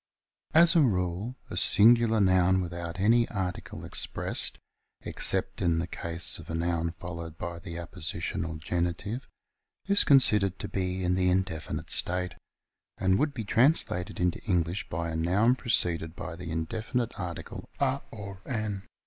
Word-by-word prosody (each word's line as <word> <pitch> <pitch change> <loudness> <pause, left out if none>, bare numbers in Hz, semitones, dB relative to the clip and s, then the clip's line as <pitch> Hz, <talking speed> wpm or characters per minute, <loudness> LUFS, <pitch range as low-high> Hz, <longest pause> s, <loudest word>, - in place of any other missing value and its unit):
As 170 +2 +7
a 165 - +6
rule 95 - 0 0.2
a - - -4
singular 115 +4 +5
noun 95 -1 +4
without 85 -1 -5
any 115 +4 +3
article 95 -4 -5
ex - - -3
pressed, - - +1 0.5
except - - -2
in 85 -2 +2
the 80 - -1
case 85 -1 +1
of - - -12
a 80 - -3
noun 85 0 -1
followed 85 -2 -7
by 85 +1 -5
the 85 0 -8
appositional 80 -1 -3
genitive, 90 +8 -3 0.6
is 200 0 +4
considered 105 -9 +4
to - - -5
be 95 -1 -2
in 90 0 +1
the 90 0 +2
in 95 +1 +3
definite 80 -5 -6
state, 90 0 +1 0.6
and 95 +2 +2
would 145 -1 0
be 115 - -3
translated 115 - +2
into 90 -1 0
English 90 -2 -1
by 85 +1 -3
a - - -4
noun 95 +9 +3
preceded 85 -10 +1
by 90 -2 -6
the 90 0 -8
indefinite 110 +9 -2
article 90 -3 -6
a - - +1
or 100 -3 -9
an. 110 -5 -3
90 Hz, 155 wpm, -28 LUFS, 85-110 Hz, 0.6 s, As